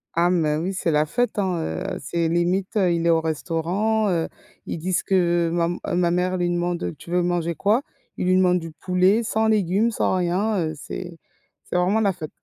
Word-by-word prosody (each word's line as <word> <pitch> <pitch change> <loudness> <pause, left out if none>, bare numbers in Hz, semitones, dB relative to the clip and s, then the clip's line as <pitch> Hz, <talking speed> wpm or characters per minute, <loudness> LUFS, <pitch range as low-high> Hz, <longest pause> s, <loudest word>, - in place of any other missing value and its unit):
Ah 170 +1 +3
mais 155 -4 +1
oui, 180 +4 -2
c'est 175 -2 0
la 150 0 +2
fête 240 +3 -1
hein, 185 -3 0 0.4
heu, - - -4
c'est 170 -1 -1
limite, 180 +4 0
heu, 185 -4 +3
il 170 0 0
est - - +4
au 165 - +4
restaurant, 175 +7 0
heu, 165 -2 0 0.4
ils - - -3
disent 180 +2 -1
que 175 -3 +2
mam 170 0 0
ma 175 -1 +2
mère 180 +1 0
lui 175 0 0
demande: 175 - -2
«tu - - -12
veux 180 0 +1
manger 170 -1 -1
quoi?» 215 - +2 0.4
il 180 - -1
lui 185 - +4
demande 180 -1 +3
du 165 - -7
poulet 185 +7 +2
sans 220 0 0
légumes, 210 +1 +2
sans 210 -4 0
rien, 185 +5 0
heu, 155 - -4
c'est 170 +3 -7 0.5
c'est - - -3
vraiment 185 +5 +2
la 200 -3 +2
fête! 160 -4 -7
180 Hz, 210 wpm, -23 LUFS, 170-190 Hz, 0.5 s, est